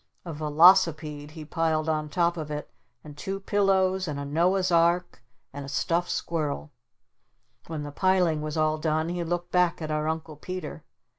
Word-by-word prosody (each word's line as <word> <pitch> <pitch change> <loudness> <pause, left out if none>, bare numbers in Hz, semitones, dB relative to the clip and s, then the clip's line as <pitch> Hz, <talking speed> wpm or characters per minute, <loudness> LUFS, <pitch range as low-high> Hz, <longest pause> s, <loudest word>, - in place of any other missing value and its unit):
A 170 - -5
velocipede 155 -1 +4
he 155 0 -9
piled 160 -1 0
on 155 -1 -1
top 170 +1 +1
of 155 -3 -5
it 150 0 -5 0.3
and 150 -1 -11
two 195 +6 -4
pillows 190 -2 +1
and 145 -2 -3
a 140 - -4
Noah's 180 +5 +1
Ark 170 -3 +2 0.3
and 140 0 -6
a 135 - -8
stuffed 170 +4 0
squirrel. 150 - -3 1.0
When 160 -2 -4
the 145 - -6
piling 180 -2 +2
was 155 +1 -4
all 155 0 +1
done 155 +1 0
he 175 0 -2
looked 175 +1 -3
back 180 -1 +2
at 155 -2 -4
our 155 0 -1
Uncle 160 -1 -4
Peter. 185 +4 -6
160 Hz, 170 wpm, -26 LUFS, 150-175 Hz, 1.0 s, velocipede